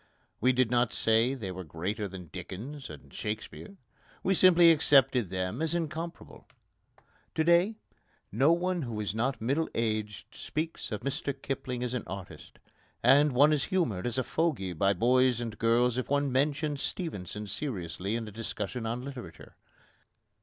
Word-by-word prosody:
We 130 - +4
did 125 -2 +2
not 120 -1 +2
say 115 +4 +2
they 105 -8 -5
were 95 0 -6
greater 95 +7 -3
than 90 -3 -9
Dickens 110 +11 -7
and 70 -2 -12
Shakespeare. 110 - -6 0.5
We 195 - +3
simply 175 -2 +7
accepted 135 - +4
them 95 - -3
as 160 +1 0
incomparable. 165 0 -5 0.9
To 160 - +2
day, 170 +6 +4 0.6
no 135 +9 +4
one 175 +1 +1
who 115 -6 -4
is 105 -2 -2
not 120 +5 -1
middle 140 +8 0
aged 110 -3 -2
speaks 160 -3 -4
of 105 - -3
Mr 140 0 -3
Kipling 125 -2 -4
as 125 0 -2
an 125 - -3
artist, 95 -1 -9 0.5
and 140 +3 +5
one 145 +5 +5
is 145 - +1
humoured 120 - 0
as 120 +1 -2
a 130 - +1
fogey 130 - -1
by 100 +4 +2
boys 125 +4 +3
and 115 -2 -4
girls 120 +2 +3
if 130 - -4
one 140 -1 +1
mentions 145 +2 0
Stevenson 105 - -4
seriously 100 - -4
in 115 -1 -3
a - - -8
discussion 115 +1 -4
on 120 +2 -3
literature. 135 -3 -9
125 Hz, 160 wpm, -29 LUFS, 105-145 Hz, 0.9 s, simply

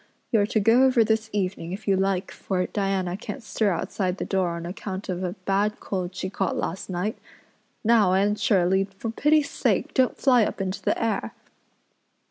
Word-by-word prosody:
You're 205 -3 +3
to 220 - +1
go 230 +5 +5
over 255 -3 +4
this 220 0 0
evening 185 -4 -2
if 210 +3 -8
you 195 - +4
like 190 -1 0
for 180 -2 -2
Diana 195 -3 -1
can't 225 +5 -7
stir 220 -1 0
outside 185 0 -2
the - - -3
door 185 -3 0
on 170 0 -6
account 190 +2 -6
of 180 0 -2
a 180 -1 -2
bad 205 +2 +1
cold 185 -2 -4
she 185 - -3
caught 195 -1 -2
last 185 +4 -4
night. 185 +4 -2 0.6
Now, 215 -5 +4
Anne 200 +2 +3
Shirley, 190 -3 +2
for 195 +3 -6
pity's 300 +4 +2
sake - - 0
don't 260 -2 +2
fly 250 -4 +4
up - - -3
into 190 0 -3
the - - 0
air." 210 - -1
195 Hz, 185 wpm, -25 LUFS, 185-220 Hz, 0.6 s, go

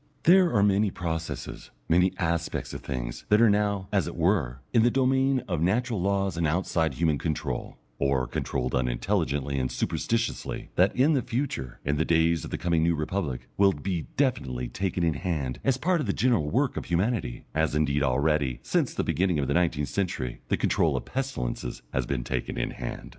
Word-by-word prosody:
There 180 0 +6
are 100 - +4
many 100 +1 +3
processes, 80 -2 -5 0.2
many 90 +2 +4
aspects 85 -1 -2
of - - -6
things, - - -5
that 105 - +5
are 115 -2 +6
now, 100 -2 0
as 95 -6 +2
it 85 - -5
were, 80 - +1
in 115 - +5
the 120 - +5
domain 130 0 +2
of 85 -6 -1
natural 110 +4 +1
laws 95 -2 0
and 85 -2 +1
outside 80 -3 0
human 80 -2 +1
control, 75 -5 -3 0.2
or 70 -2 +1
controlled 60 +1 -2
unintelligently 65 +3 0
and 65 -1 -1
superstitiously, 115 0 -2
that - - +3
in 140 +5 +4
the 135 - +2
future, 115 - -3
in 70 +1 +1
the 80 - +2
days 80 0 +2
of - - -6
the - - -3
coming 85 -2 +1
New 85 +1 +2
Republic, 75 -4 -3
will 100 -1 +5
be 85 +2 -3
definitely 65 - 0
taken 95 -1 -2
in 80 -2 +2
hand 75 -5 -3
as 135 -2 +2
part 170 +4 +1
of 135 - -3
the 100 - +1
general 110 -11 +2
work - - +1
of - - -3
humanity, 90 - -1
as 80 -1 +1
indeed 75 -1 +1
already, 70 -1 +1
since - - 0
the - - 0
beginning 90 -3 +1
of 70 -2 0
the - - +1
nineteenth 80 -5 +1
century, 85 -11 -2
the - - +1
control - - +2
of - - -5
pestilences 60 - -4
has 65 -2 0
been 65 -3 -1
taken 60 0 -3
in - - -1
hand. - - -6
85 Hz, 190 wpm, -27 LUFS, 70-100 Hz, 0.2 s, There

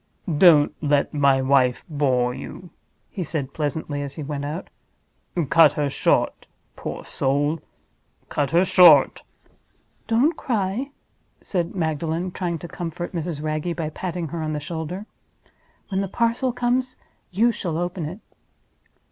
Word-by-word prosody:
"Don't 155 -2 +6
let 145 -2 +1
my 140 -2 +3
wife 130 -2 +3
bore 130 -6 +1
you," 180 +6 -9 0.4
he 195 - -5
said, 145 -5 -3
pleasantly, 145 -1 -3
as 140 -1 -6
he 155 - -5
went 145 0 -4
out. 150 +5 -5 0.8
"Cut 165 -3 +7
her 145 -2 -1
short, - - +1 0.3
poor - - -6
soul—cut 145 0 -3
her 175 +3 +4
short!" 170 -7 +6 0.9
"Don't 250 +9 +3
cry," 225 +2 -2 0.5
said 175 -2 -2
Magdalen, 165 +1 -1
trying 175 -2 -2
to 175 - -8
comfort 175 0 -5
Mrs. 165 -3 -3
Wragge 155 +2 -2
by 155 -2 -3
patting 175 -1 -4
her 165 +2 -4
on 155 0 -2
the 150 - -2
shoulder. 165 +5 -5 0.8
"When 190 -1 0
the 195 - -2
parcel 235 +5 0
comes 250 +1 0
back - - -35 0.2
you 225 +6 +3
shall 170 -7 -3
open 175 -1 -3
it." 180 +8 -7
165 Hz, 140 wpm, -23 LUFS, 145-185 Hz, 0.9 s, Cut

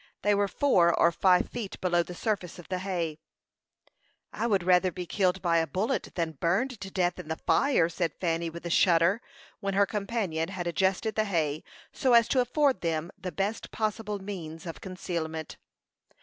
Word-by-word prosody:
They 205 - +4
were 200 0 +2
four 190 -8 +3
or 170 - +5
five 180 +1 +3
feet 225 -5 -5
below 175 -2 +2
the 175 +1 -7
surface 190 -4 -2
of 175 - -12
the 185 -1 -1
hay. 170 -5 -3 1.1
"I 235 - -1
would 200 -5 +2
rather 180 +1 +4
be 180 +1 -5
killed 190 +1 0
by 170 -2 +3
a 160 - 0
bullet 190 +10 -1
than 160 -5 -2
burned 210 +8 +1
to 195 - -5
death 180 -2 0
in - - -8
the 160 - -2
fire," 275 - +2
said 165 -2 -2
Fanny, 165 -1 0
with 170 +1 -9
a 170 - -3
shudder, 175 +5 +4 0.4
when 200 -2 -2
her 200 0 +5
companion 200 -6 -2
had 185 -3 -4
adjusted 190 +6 0
the 215 - +1
hay 155 -6 -1 0.3
so 255 -2 +2
as 235 -1 +6
to 260 - +3
afford 265 -2 +1
them 165 +1 -2
the 190 -2 -6
best 200 +4 -2
possible 215 -1 -2
means 180 -5 -7
of 165 -5 -7
concealment. 170 -4 -5
185 Hz, 185 wpm, -28 LUFS, 170-205 Hz, 1.1 s, as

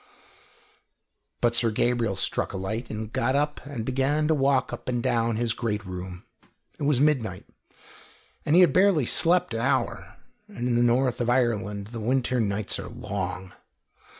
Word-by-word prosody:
But 120 -1 +3
Sir 115 0 +2
Gabriel 115 -2 0
struck 95 - -1
a - - -3
light 110 +5 -4
and 110 +1 -6
got 130 +3 +1
up 150 +1 -1
and 125 -6 -5
began 135 +4 +1
to - - +5
walk 135 -3 +1
up - - -6
and 120 -1 -1
down 115 -1 +1
his 115 0 0
great 105 -4 -3
room. 90 -1 -7 0.5
It 145 - -2
was 140 -3 +2
midnight, 125 -11 +1 1.0
and 150 - +2
he 180 - +8
had 180 - +5
barely 185 -7 +4
slept 170 +1 +2
an 115 - -2
hour, - - -1 0.3
and 120 +1 -4
in 120 - +1
the 120 - +3
north 120 +1 +2
of 120 - 0
Ireland 105 -5 0
the 115 - -4
winter 125 +2 0
nights 105 -1 -1
are - - -7
long. 100 -5 -5
120 Hz, 170 wpm, -26 LUFS, 105-135 Hz, 1.0 s, he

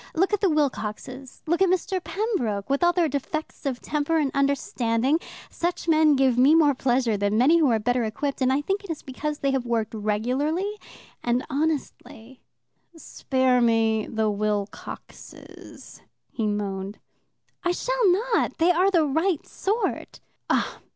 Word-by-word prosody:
Look 380 +5 +1
at 415 - +1
the 390 - +3
Wilcoxes, 260 -3 -3
look 340 +3 0
at 380 - +5
Mr. 370 0 -1
Pembroke. 265 - -2
With 280 +4 +1
all 345 - +5
their 350 -2 +1
defects 290 +2 -4
of 255 -2 -2
temper 300 +2 -1
and 290 -4 +1
understanding, 275 -1 +1 0.3
such 345 0 -3
men 310 -2 +4
give 260 -2 +2
me 280 +5 +6
more 300 -3 +5
pleasure 245 -4 +1
than 205 +1 0
many 295 +8 +5
who 300 -5 +3
are 230 - +3
better 245 +3 0
equipped 270 +6 -3
and 260 0 +3
I 275 +2 +1
think 390 +7 -2
it 400 - -12
is 325 - -5
because 295 +3 -4
they 275 -1 0
have 265 -2 0
worked 225 -2 -1
regularly 260 - -1 0.4
and 240 +1 0
honestly. 275 -4 -4 0.6
"Spare 260 -5 0
me 225 -2 +2
the 220 -1 0
Wilcoxes," 205 0 -6 0.3
he 220 -3 -2
moaned. 200 -1 -3 0.7
"I 355 - +1
shall - - +1
not. 450 +5 0
They 335 +2 +4
are 360 +3 +3
the 340 -5 +3
right 320 +4 0
sort." 425 +4 -3
275 Hz, 155 wpm, -25 LUFS, 230-330 Hz, 0.7 s, me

